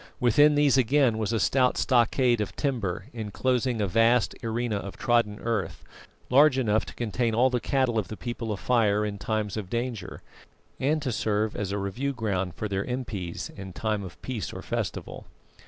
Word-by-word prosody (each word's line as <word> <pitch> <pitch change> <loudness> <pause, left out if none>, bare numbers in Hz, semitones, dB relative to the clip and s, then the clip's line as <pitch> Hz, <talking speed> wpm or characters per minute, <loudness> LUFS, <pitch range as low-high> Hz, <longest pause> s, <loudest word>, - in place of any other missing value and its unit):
Within 145 +5 +5
these 145 -2 +4
again 130 -2 +3
was 110 0 -1
a 115 - +1
stout 130 +1 +2
stockade 120 -1 +3
of 105 - -4
timber, 110 -10 -2
enclosing 120 +2 -1
a 105 - +1
vast 115 +4 +3
arena 115 -1 -1
of 100 -1 -7
trodden 115 -3 +1
earth, 115 -4 -2 0.5
large 140 +1 +6
enough 110 -4 +1
to - - -10
contain 115 0 -1
all 125 +3 +4
the 125 - +1
cattle 130 -3 +1
of 105 - -3
the 110 - -7
People 120 -2 -4
of 100 - -3
Fire 105 -4 +2
in 100 -1 -4
times 110 0 -2
of 100 -4 -5
danger, 115 -4 -4 0.6
and 150 +3 +1
to 130 - -1
serve 110 -1 0
as 100 -2 -3
a 100 - -1
review 100 +8 -2
ground 95 -7 -2
for 110 - -3
their 95 -1 -1
impis 110 -9 -4
in 95 -1 -8
times 105 0 -2
of 90 - -11
peace 120 -6 -4
or - - -8
festival. - - -4
115 Hz, 185 wpm, -27 LUFS, 105-125 Hz, 0.6 s, large